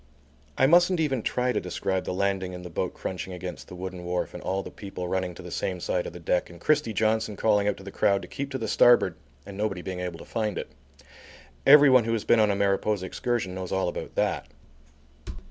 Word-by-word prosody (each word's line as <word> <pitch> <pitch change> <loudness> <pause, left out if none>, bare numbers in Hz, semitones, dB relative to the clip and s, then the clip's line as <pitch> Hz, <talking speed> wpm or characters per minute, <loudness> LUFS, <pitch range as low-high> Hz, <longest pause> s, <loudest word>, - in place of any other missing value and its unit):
I - - +5
mustn't 175 +4 +5
even 135 -6 +1
try 125 +3 0
to - - 0
describe 95 +1 -2
the - - -3
landing 95 -1 -1
and 90 0 -9
the 90 - -8
boat - - -2
crunching 95 0 -5
against 90 0 -7
the - - -10
wooden 90 0 -6
wharf 90 0 -2
and - - -7
all 95 +1 -2
the - - -9
people 95 -3 -6
running 90 -1 -2
to 90 - -10
the 90 - -9
same 90 +1 -2
side 90 +1 -1
of - - -8
the 90 - -9
deck 90 +1 0
and 85 -1 -13
Christie 150 - +2
Johnson 110 0 0
calling 105 -1 +2
out 105 - 0
to 95 - -12
the 100 - -8
crowd 100 0 +2
to - - -8
keep 140 0 -5
to 135 - -3
the 115 -3 -4
starboard 120 -5 +5 0.3
and 100 -1 -9
nobody 100 -3 -2
being 95 -1 -5
able 90 -2 -4
to - - -11
find 110 -3 -2
it. - - -5 1.0
Everyone 135 -4 +8
who 115 - 0
has 110 - -1
been 115 - +4
on 105 -1 +4
a 100 - +1
Mariposa 100 0 +1
excursion 115 -1 -2
knows 95 -1 -5
all 95 -1 +1
about 85 - -5
that. - - 0
100 Hz, 230 wpm, -26 LUFS, 90-110 Hz, 1.0 s, Everyone